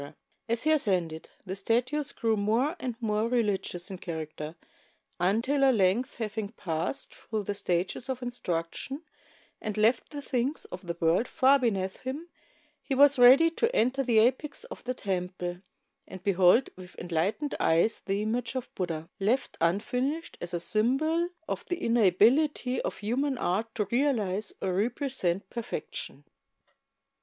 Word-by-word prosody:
As 230 0 +1
he 310 - +3
ascended, 180 - 0 0.2
the 190 0 -4
statues 250 +8 0
grew 225 -1 0
more 225 - +1
and 250 -5 -3
more 220 -1 0
religious 205 -6 -1
in 190 - -6
character 155 -2 -6 0.6
until 230 +10 +2
at 265 -2 +5
length, 205 +6 +2
having 215 -2 -3
passed 175 0 -3
through 215 -2 -4
the 205 - -2
stages 185 +6 -2
of 255 -1 -3
instruction 245 - -3 0.6
and 215 -1 -4
left 225 +3 +3
the 290 -1 -7
things 260 +4 -1
of 180 0 -9
the 170 -1 -3
world 170 +9 +2
far 270 +2 +4
beneath 195 -6 -1
him, 290 +7 -6 0.5
he 270 - -2
was 285 0 +6
ready 265 +7 +8
to 460 +8 0
enter 255 +4 +2
the 240 -4 +2
apex 260 +6 +2
of - - -10
the 255 +1 -2
temple 180 -3 -3 0.5
and 185 -1 -10
behold 195 +5 +4
with 185 0 -12
enlightened 180 - -1
e3 165 +1 +4
es 220 - -1
the 200 +2 -2
image 235 +3 -2
of 255 - -4
Buddha, 165 -3 -3
left 230 +7 0
unfinished 250 - 0
as 175 - -4
a - - -1
symbol 270 - +1 0.2
of - - -3
the 355 - -1
inability 240 - +3
of - - -4
human 260 +6 -1
art 220 +3 -1
to 210 - 0
realize 215 -4 0
or 185 - 0
represent 205 - -1
perfection. 185 - -5
220 Hz, 150 wpm, -28 LUFS, 185-260 Hz, 0.6 s, ready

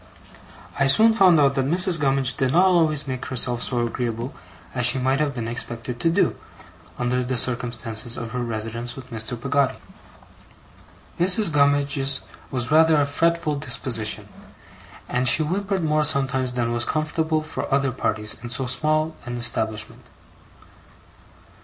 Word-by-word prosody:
I 135 - +3
soon 220 +11 +5
found 185 -7 +5
out 140 -1 +3
that 135 -1 -1
Mrs. 175 +2 +2
Gummidge 135 -2 +2
did 130 -1 0
not 180 +3 +5
always 160 -5 +2
make 130 -1 -5
herself 125 -2 +1
so 120 -2 0
agreeable 120 +1 -4 0.4
as 125 -2 +2
she 125 - +2
might 130 +2 0
have 145 -3 -1
been 115 -2 -4
expected 120 0 -4
to 165 - +1
do, 165 - +1 0.6
under 125 +1 -1
the 125 0 -2
circumstances 120 -1 -1
of 115 -1 -6
her 125 - -4
residence 115 +1 -4
with 130 -1 -12
Mr. 115 +1 -4
Peggotty. 140 +1 0 1.4
Mrs. 185 +2 +4
Gummidge's 140 -1 +1 0.3
was 125 -1 -3
rather 160 0 +5
a 145 - +2
fretful 165 +2 0
disposition, 115 -7 -1 0.8
and 125 +1 -1
she 155 - +6
whimpered 190 +3 -2
more 155 -1 +1
sometimes 135 -4 +1
than 120 -1 -1
was 120 0 0
comfortable 155 +1 -1
for 155 - -6
other 135 -1 +1
parties 110 -4 -2
in 120 - -7
so 130 +3 -2
small 155 +5 0
an 120 0 -4
establishment. 110 -2 -2
135 Hz, 150 wpm, -22 LUFS, 120-155 Hz, 1.4 s, she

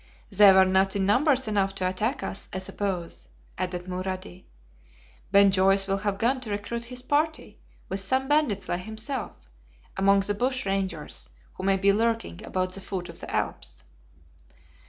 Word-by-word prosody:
"They 200 0 +8
were 190 0 +6
not 190 +1 +2
in 195 -1 +1
numbers 260 +5 +3
enough 195 -2 0
to 185 -1 -1
attack 215 +9 -2
us, - - -2
I - - -4
suppose," 185 -2 -3 0.3
added 180 -1 -3
Mulrady. 185 0 -5 0.9
"Ben 200 0 +6
Joyce 195 +1 +4
will 195 0 -1
have 200 0 -1
gone 245 +5 +1
to 245 -4 -5
recruit 210 +3 -3
his 250 +1 -5
party, 305 +4 -1 0.3
with 190 - -2
some 260 +8 0
bandits 260 -11 +1
like 175 - -2
himself, 220 +5 -5 0.6
among 195 +1 +4
the 205 +1 -1
bush 255 +4 -1
rangers 190 -5 -3 0.2
who - - -9
may 195 0 +3
be 200 +1 +3
lurking 225 - -1
about 185 0 -2
the 195 - -8
foot 185 -2 -5
of - - -6
the - - -8
Alps." 65 - -3
195 Hz, 165 wpm, -26 LUFS, 190-225 Hz, 0.9 s, They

